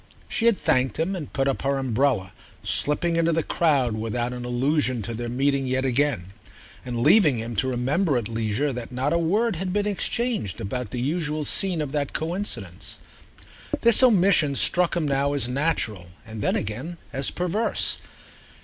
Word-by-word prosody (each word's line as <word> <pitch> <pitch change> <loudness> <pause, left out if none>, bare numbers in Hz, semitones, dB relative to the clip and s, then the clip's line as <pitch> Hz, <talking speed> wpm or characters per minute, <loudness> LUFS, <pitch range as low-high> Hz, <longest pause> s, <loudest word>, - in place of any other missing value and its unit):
She 235 -1 +1
had 230 -4 +4
thanked 130 +1 +1
him 170 +5 -1
and 160 -6 -6
put 135 0 0
up 135 - -1
her 140 0 0
umbrella, 125 -6 0 0.3
slipping 165 +3 +1
into 165 0 +2
the 165 0 +1
crowd 140 -8 +1
without 115 +3 -2
an 125 -1 -6
allusion 130 0 0
to 115 - -4
their 120 +1 -4
meeting 135 +2 0
yet 130 +1 0
again 125 -8 0 0.5
and 120 -2 -3
leaving 155 - +5
him 115 +1 -5
to 130 - +1
remember 135 +5 +1
at 115 -4 -2
leisure 115 +5 -1
that 125 0 -6
not 130 +5 -1
a 170 - +2
word 205 +5 +1
had 185 +1 -2
been 205 +2 0
exchanged 210 - -1
about 125 +3 -4
the 125 - -4
usual 150 +2 -1
scene 180 0 0
of 140 - -6
that 145 -2 -2
coincidence. 155 - -3 0.8
This 235 +1 +6
omission 190 - +4
struck 175 +4 +2
him 160 -3 0
now 140 0 +1
as 140 -4 +1
natural 125 - -1 0.2
and 110 -1 -7
then - - +1
again 125 +12 -3 0.2
as 135 +1 0
perverse. 180 +6 0
140 Hz, 175 wpm, -24 LUFS, 120-170 Hz, 0.8 s, This